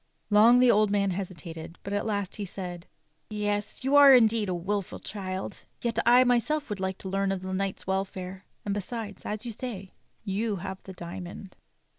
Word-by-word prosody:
Long 220 +4 +7
the 250 -1 +6
old 210 -1 +4
man 200 -1 +2
hesitated, 170 -3 -6
but 200 - -4
at 205 +2 -1
last 200 -3 -2
he 210 - -3
saitl: 180 -2 -6 0.4
"Yes, 205 +1 -2
you 270 +2 +2
are 280 -2 +10
indeed 225 -4 +4
a - - 0
wilful 195 +2 -2
child. 190 -1 -5 0.2
Yet 235 -1 -1
I 245 +1 +8
myself 255 +3 +1
would 205 - -3
like 190 0 -2
to - - -2
learn 195 +1 0
of 190 -1 -3
the 190 0 -4
knight's 195 0 -2
welfare; 190 0 -3 0.2
and 200 - 0
besides, 205 +1 -5
as 215 +2 -3
you 235 - -3
say, 205 -5 -6 0.3
you 210 +1 -1
have 190 +1 -6
the 190 - -8
diamond." 180 +2 -8
200 Hz, 185 wpm, -28 LUFS, 190-220 Hz, 0.4 s, are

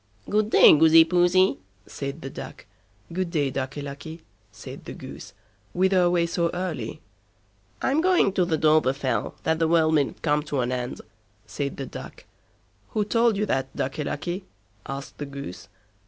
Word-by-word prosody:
"Good 210 +1 +1
day, - - +8
Goosey 160 +1 +7
Poosey", 175 - +3 0.3
said 140 +3 -6
the 135 - -6
Duck. - - -9 0.5
"Good 185 0 -1
day, 145 -5 0
Ducky 135 +2 -4
Lucky", 155 +4 -8 0.3
said - - -10
the - - -7
Goose, - - -10 0.4
"whither 190 +1 +3
away 175 -1 +3
so 170 0 0
early?" 160 -11 -4 0.8
"I'm 280 +4 +2
going 360 - +3
to 185 - +2
the 170 -2 0
Dovrefell, 145 -4 +1
that 160 0 +1
the 165 - +2
world 160 -1 +3
mayn't 145 -3 0
come 150 -1 +2
to 145 -3 -1
an 120 +1 -1
end", 125 0 -4 0.4
said 140 -1 -4
the 135 - -4
Duck. - - -10 0.7
"Who 210 - +2
told 230 0 +2
you 210 - +1
that, 135 -7 -2
Ducky 135 +3 -2
Lucky?" 180 +6 -4 0.4
asked 135 0 -7
the 145 - -4
Goose. 140 -9 -8
160 Hz, 160 wpm, -25 LUFS, 140-180 Hz, 0.8 s, day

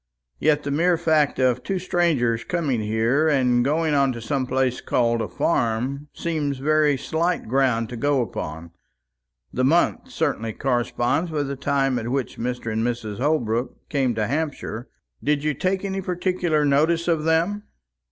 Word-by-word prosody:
Yet 150 -1 +2
the 140 - -3
mere 170 +4 +2
fact 155 -3 +2
of 125 -1 +2
two 195 - -2
strangers 160 -11 +1
coming 150 -10 -1
here, 115 +8 +1
and 125 -5 +3
going 155 +3 +1
on 140 -2 +3
to 120 - -6
some 130 +3 -2
place 130 -1 0
called 115 -1 +1
a - - -2
farm, 130 +2 -1
seems 150 -5 -2
very 150 +1 +2
slight 170 +4 -1
ground 125 -2 +1
to 125 - -6
go 145 +3 +1
upon. 80 -5 -6 0.8
The 130 - 0
month 165 +7 +2
certainly 110 0 -2
corresponds 125 +5 0
with 145 -3 -2
the 140 - -3
time 135 -2 0
at 115 +1 -4
which 135 0 -2
Mr. 120 -2 -3
and 110 +1 0
Mrs. 115 -4 -3
Holbrook 125 -4 -1
came 130 -5 0
to 110 -1 0
Hampshire. 140 -4 -3 0.3
Did 150 -1 +1
you 155 0 +1
take 185 +7 -1
any 195 0 -2
particular 180 -4 0
notice 160 +4 +2
of 165 -3 +1
them?" 170 +6 +1
140 Hz, 160 wpm, -23 LUFS, 120-160 Hz, 0.8 s, and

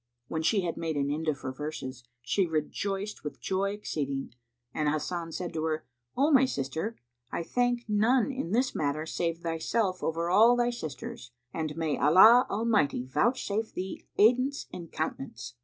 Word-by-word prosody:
When 160 - -2
she 200 +5 +2
had 170 -2 -3
made 160 -2 -2
an 140 0 0
end 160 +2 -3
of 145 -3 0
her 130 - -3
verses, 130 -3 -6 0.2
she 185 +9 +1
rejoiced 195 +6 -3
with 150 - -6
joy 195 +1 -1
exceeding 140 -11 -3 0.4
and 150 -1 +1
Hasan 165 +2 -2
said 180 -2 -4
to 155 - -2
her, 155 -1 -2 0.3
"O 285 +4 +3
my 265 -2 +6
sister, 160 - -3 0.4
I - - -2
thank 245 +4 0
none 225 +5 +3
in 260 -10 -4
this 250 +4 +2
matter 150 +1 -1
save 165 0 -2
thyself 185 +4 -1
over 165 +1 -1
all 220 +7 +6
thy 240 0 +2
sisters, 140 - -7 0.2
and 155 -1 -3
may 160 -3 -1
Allah 215 - +7
Almighty 210 - +1
vouchsafe 215 - 0
thee 190 +1 -6
aidance 255 +6 +3
and 170 -2 -8
countenance!" 135 -5 -4
170 Hz, 165 wpm, -29 LUFS, 155-220 Hz, 0.4 s, Allah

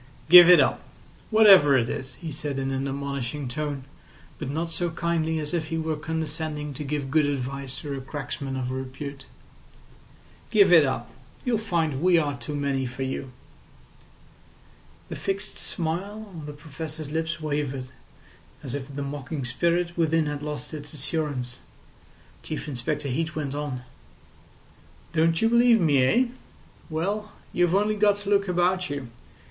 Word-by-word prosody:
"Give 175 0 +11
it 180 - +9
up—whatever 195 - +4
it 115 -2 +1
is," 130 +1 -5
he 165 -3 -7
said 145 -1 -3
in 135 0 -1
an 135 +1 -1
admonishing 140 0 -3
tone, 145 +1 -3 0.6
but 150 - -4
not 165 +4 -2
so 175 +1 -1
kindly 160 -1 0
as 150 0 -3
if 160 -2 -1
he 165 0 -2
were 160 -1 -1
condescending 155 -1 -3
to 145 - -5
give 140 -1 -3
good 155 -1 +4
advice 140 -1 -3
to 145 -2 -5
a 135 - -5
cracksman 135 -1 -5
of 125 -1 -2
repute. 135 +1 -6 1.2
"Give 200 -4 +5
it 160 -4 +8
up. 120 -2 -3 0.3
You'll 240 -4 +1
find 165 -9 -1
we 180 0 +5
are 145 -3 +1
too 145 +2 -6
many 140 -2 0
for 125 +2 -5
you." 130 0 -4 1.8
The - - -4
fixed 195 +1 -3
smile 200 +6 -4
on 155 -2 -7
the 150 - -6
Professor's 155 0 -7
lips 160 +1 -2
wavered, 145 -4 -2 0.7
as 130 -3 -6
if 140 -2 -4
the 140 - -3
mocking 140 0 -4
spirit 170 +7 0
within 165 -1 +2
had 145 -1 -3
lost 150 +1 -5
its 150 -1 -7
assurance. 135 -4 -3 0.8
Chief 155 - -5
Inspector 145 +2 -2
Heat 155 +4 -2
went 145 -3 -2
on: 145 -4 -4 1.3
"Don't 165 +3 +2
you - - +5
believe 235 0 +5
me 145 -7 +4
eh? 235 - +4 0.6
Well, 200 +7 -2 0.2
you've 175 0 +3
only 210 +2 +2
got 205 -1 +4
to 205 0 -5
look 200 -1 +3
about 180 +1 +1
you. 140 -4 -4
150 Hz, 155 wpm, -26 LUFS, 140-170 Hz, 1.8 s, Give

